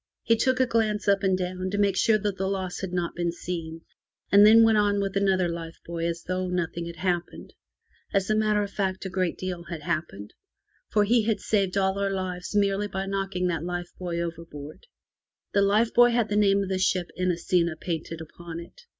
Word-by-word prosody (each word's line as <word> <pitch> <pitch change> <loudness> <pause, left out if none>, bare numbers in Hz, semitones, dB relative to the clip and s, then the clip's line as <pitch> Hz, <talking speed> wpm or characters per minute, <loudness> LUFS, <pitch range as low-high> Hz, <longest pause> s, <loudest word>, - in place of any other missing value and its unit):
He 230 - +4
took 255 +3 +1
a 260 - +5
glance 220 -4 0
up 200 -1 +4
and 190 -1 +2
down 185 0 -3
to 205 - -2
make 200 -2 +2
sure 215 +3 +4
that 205 -1 -2
the 190 0 -2
loss 190 -2 -3
had 190 -2 -4
not 175 -1 -2
been 175 0 -1
seen, 165 -2 -6 0.5
and 200 +1 +8
then 225 +2 +8
went 220 -1 +5
on 205 -1 +2
with 195 -1 -2
another 190 -2 +2
life 170 -1 -6
buoy 170 0 -3
as 170 0 -4
though 185 0 -2
nothing 170 -1 -2
had 170 - -7
happened. 175 0 -3 0.6
As 195 -1 +1
a 215 - +2
matter 215 -1 +2
of 200 - -6
fact, 190 -1 -2
a 190 - -4
great 185 -2 -1
deal 180 -2 -5
had 165 -2 -7
happened, 105 - -4 0.6
for 210 - +3
he 225 +1 +3
had 215 -3 +1
saved 195 -2 0
all 190 0 +1
our 200 0 +1
lives 185 0 -4
merely 200 0 +2
by 190 -1 -4
knocking 195 -2 -2
that 165 -2 -2
life 175 0 -4
buoy 175 -2 -3
over 170 -1 -4
board. 150 - -11 0.7
The 200 - +4
life 210 +4 +3
buoy 240 0 +6
had 235 -2 +1
the 205 - -1
name 200 -1 +3
of 190 - -5
the 190 -1 -1
ship 185 -2 0
Inesita 175 -2 +1
painted 165 -1 -4
upon 165 +1 -8
it. 170 - -12
190 Hz, 215 wpm, -26 LUFS, 170-205 Hz, 0.7 s, and